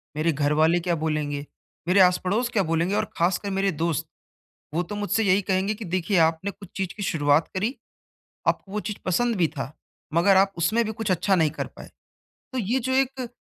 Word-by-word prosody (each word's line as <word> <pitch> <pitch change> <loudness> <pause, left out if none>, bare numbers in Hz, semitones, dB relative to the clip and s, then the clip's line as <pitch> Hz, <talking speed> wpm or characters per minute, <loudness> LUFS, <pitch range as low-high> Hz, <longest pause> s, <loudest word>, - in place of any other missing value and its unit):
मेरे 160 +2 +1
घर 145 0 +1
वाले 160 +3 +4
क्या 175 0 0
बोलेंगे, 150 -2 -2 0.4
मेरे 185 +2 +4
आस 180 -1 +6
पड़ोस 220 +7 0
क्या 220 -5 +1
बोलेंगे 165 +3 0
और - - +1
खासकर 180 +4 +1
मेरे 195 0 +1
दोस्त, 160 0 -1 0.7
वो 170 +3 +1
तो 195 +4 -6
मुझसे 205 +2 0
यही 195 0 +3
कहेंगे 190 +2 0
की 215 0 -7
देखिए 185 +2 0
आपने 165 +5 -3
कुछ 195 -1 -14
चीज़ 190 -2 -3
की 200 - -3
शुरुआत 145 -2 +2
करी, 215 +8 -1 0.7
आपको 195 - -1
वो 210 - -1
चीज़ 210 0 -5
पसंद 230 +6 +1
भी 175 -3 +3
था, 135 +1 -4 0.4
मगर 185 +4 +5
आप 195 +1 +4
उसमें 220 +8 +2
भी 220 - -3
कुछ 220 -1 -3
अच्छा 190 +2 +2
नहीं 160 -3 +3
कर 155 - -4
पाए। - - -13 0.6
तो 260 - -2
ये 235 +3 0
जो 260 +2 -2
एक 260 -1 0
185 Hz, 205 wpm, -25 LUFS, 165-205 Hz, 0.7 s, आस